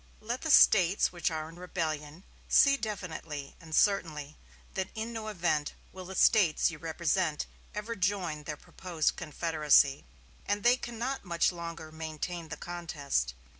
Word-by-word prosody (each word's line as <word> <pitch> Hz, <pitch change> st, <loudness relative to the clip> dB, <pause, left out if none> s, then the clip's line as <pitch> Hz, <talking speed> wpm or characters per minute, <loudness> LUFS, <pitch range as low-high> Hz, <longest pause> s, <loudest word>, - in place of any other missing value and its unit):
"Let 235 Hz, +4 st, -4 dB
the 315 Hz, -, -3 dB
States 195 Hz, -, +6 dB
which 175 Hz, +1 st, -1 dB
are 155 Hz, -1 st, -4 dB
in 165 Hz, +1 st, -12 dB
rebellion 160 Hz, -2 st, -4 dB, 0.3 s
see 275 Hz, -1 st, +6 dB
definitely 165 Hz, -, -5 dB
and 160 Hz, -1 st, -5 dB
certainly 155 Hz, -7 st, +1 dB, 0.4 s
that 190 Hz, -1 st, -2 dB
in 225 Hz, +1 st, -4 dB
no 220 Hz, -1 st, -5 dB
event 170 Hz, -7 st, 0 dB, 0.2 s
will 185 Hz, -1 st, -8 dB
the 190 Hz, +1 st, -7 dB
States 180 Hz, -8 st, +4 dB
you 155 Hz, -, -9 dB
represent 165 Hz, 0 st, 0 dB, 0.3 s
ever 215 Hz, +3 st, -4 dB
join 180 Hz, -6 st, -1 dB
their 150 Hz, 0 st, -4 dB
proposed 170 Hz, -2 st, -2 dB
confederacy, 150 Hz, -3 st, +2 dB, 0.4 s
and 205 Hz, 0 st, 0 dB
they 245 Hz, +1 st, +6 dB
cannot 245 Hz, +3 st, -4 dB
much 170 Hz, -2 st, +1 dB
longer 170 Hz, -2 st, -7 dB
maintain 160 Hz, +1 st, -5 dB
the -, -, -5 dB
contest. 145 Hz, -, -2 dB
170 Hz, 145 wpm, -30 LUFS, 155-200 Hz, 0.4 s, States